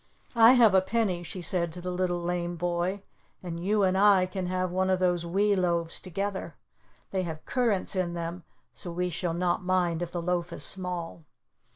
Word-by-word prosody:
"I 230 +1 +8
have 235 -5 +6
a 190 - +6
penny," 195 -3 0
she 175 +1 -7
said 170 -2 0
to 180 - -7
the 180 +1 -4
Little 180 -1 -1
Lame 175 0 -2
Boy, 175 +3 -2 0.4
"and 170 -1 -5
you 205 +2 +2
and 185 0 +2
I 195 -1 +5
can 185 0 -4
have 185 0 -1
one 185 +1 0
of 185 - +3
those 175 -2 0
wee 200 +4 +2
loaves 170 -3 +1
together. 195 +2 -4 0.6
They 190 - 0
have 160 -3 -6
currants 230 -7 0
in 175 -2 -1
them, 170 +1 -5 0.3
so 175 - -6
we 180 +1 -2
shall 170 0 -2
not 180 +2 0
mind 180 -2 +1
if 175 -1 -4
the 175 - -3
loaf 175 0 -1
is 145 - -4
small." 180 -3 -2
180 Hz, 195 wpm, -28 LUFS, 175-190 Hz, 0.6 s, I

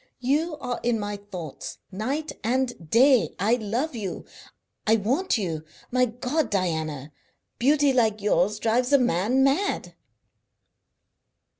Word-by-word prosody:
You 300 +6 0
are 250 -3 -4
in 235 -2 +1
my 205 0 -3
thoughts 185 -7 -8
night 265 +11 -3
and 240 -7 -1
day. 255 - +4
I 210 +5 +2
love 245 +7 -2
you; 200 -6 -5 0.6
I 220 - +6
want 255 - +1
you. 165 -7 -3 0.3
My 250 0 +3
God, 250 +4 -2
Diana! 160 -7 -2 0.5
Beauty 285 +2 +4
like 220 -4 +2
yours 210 0 +2
drives 235 +4 +1
a 280 - +7
man 245 +2 +2
mad!" 290 +10 0
235 Hz, 125 wpm, -25 LUFS, 205-265 Hz, 0.6 s, a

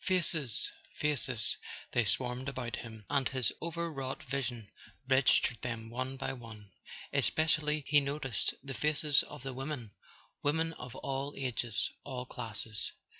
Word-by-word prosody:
Faces, 165 - +2 0.2
faces—they 125 -4 +1
swarmed 125 +4 0
about 125 -4 -3
him, 110 -3 -8
and 140 -2 +2
his 130 -3 +2
overwrought 165 -5 -3
vision 120 -4 -2 0.4
registered 130 -3 +4
them 115 -2 -4
one 130 +2 -2
by 135 - -2
one. 110 -5 -10 0.4
Espe¬ 155 - +3
cially 150 -1 +2
he 145 0 +6
noticed 140 -5 -1
the 135 -1 -4
faces 150 0 +4
of - - -9
the 135 -1 -3
women, 130 -4 -4 0.5
women 160 +3 +2
of 125 -5 -8
all 135 +1 -2
ages, 120 -4 +1
all 130 -2 -4
classes. 110 -3 -2
130 Hz, 130 wpm, -33 LUFS, 120-145 Hz, 0.5 s, he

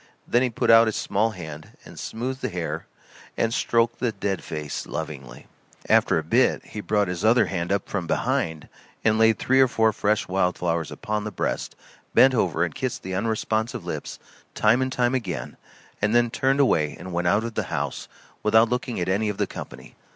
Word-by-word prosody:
Then 120 - +3
he 130 - +2
put 115 - +1
out 115 0 +7
his 110 - -1
small 105 +3 +1
hand 80 -7 -9
and - - -11
smoothed 130 +4 -4
the - - -1
hair 90 -2 -4 0.5
and 115 0 +1
stroked 115 -1 +1
the 120 -2 0
dead 100 -3 -3
face 75 -2 -5
lovingly. 75 -5 -6 0.4
After - - +4
a 80 - -1
bit 120 +11 +2
he 105 - -7
brought 105 -1 +1
his 90 +1 -4
other 115 +3 +5
hand 85 -1 -3
up 100 - 0
from 95 -4 -3
behind 80 -1 -1
him - - -18 0.3
and 110 -1 +3
laid 110 -1 +5
three 130 +1 +3
or 130 - +6
four 110 -2 +2
fresh 105 +2 0
wild 90 -1 +1
flowers 85 -2 -1
upon 105 0 -3
the 110 - -3
breast, - - -3 0.4
bent 130 0 +7
over 85 -8 +1
and 85 -3 -2
kissed 130 -2 -4
the 95 - -5
unresponsive 110 +3 -1
lips - - -5 0.4
time 110 +4 +3
and 130 0 -1
time 125 -1 +1
again, 90 - -3 0.5
and 105 +3 +2
then 120 -1 +3
turned 135 +3 +1
away 75 - +2
and 90 0 -8
went 85 0 0
out 105 +4 +3
of 115 -1 -4
the - - -2
house - - -3 0.3
without 110 +2 +4
looking 125 -2 -2
at 90 - -1
any 100 +3 +1
of 105 - -4
the - - +1
company. - - -9
105 Hz, 200 wpm, -24 LUFS, 90-115 Hz, 0.5 s, out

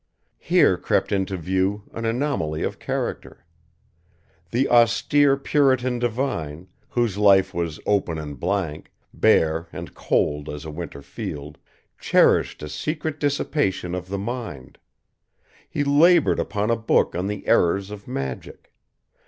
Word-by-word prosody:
Here - - +3
crept - - 0
into 95 -1 -1
view 95 +4 -1
an 115 - -4
anomaly 115 - -1
of - - -3
character. - - -4 1.0
The 130 +7 +1
austere 135 +4 +4
Puritan 130 -3 +2
divine, 110 - -3 0.2
whose 115 -5 0
life 100 -2 +5
was 85 -2 -3
open 95 -5 +1
and 75 -2 -7
blank, 90 -4 -2 0.2
bare 80 +1 +2
and - - -8
cold 75 0 0
as 75 +1 -7
a 80 - -6
winter 75 -3 -7
field, 70 +1 -7 0.4
cherished - - +3
a - - -4
secret 155 - -3
dissipation 145 - -1
of 90 0 -5
the 100 - -2
mind. 105 - -6 0.9
He 145 - -1
labored 155 +4 +4
upon 105 +2 -1
a - - +3
book 115 0 +1
on 90 +3 -2
the 105 0 -5
errors 95 +4 +2
of 100 -1 -9
magic. 65 -2 -6
100 Hz, 130 wpm, -23 LUFS, 80-125 Hz, 1.0 s, life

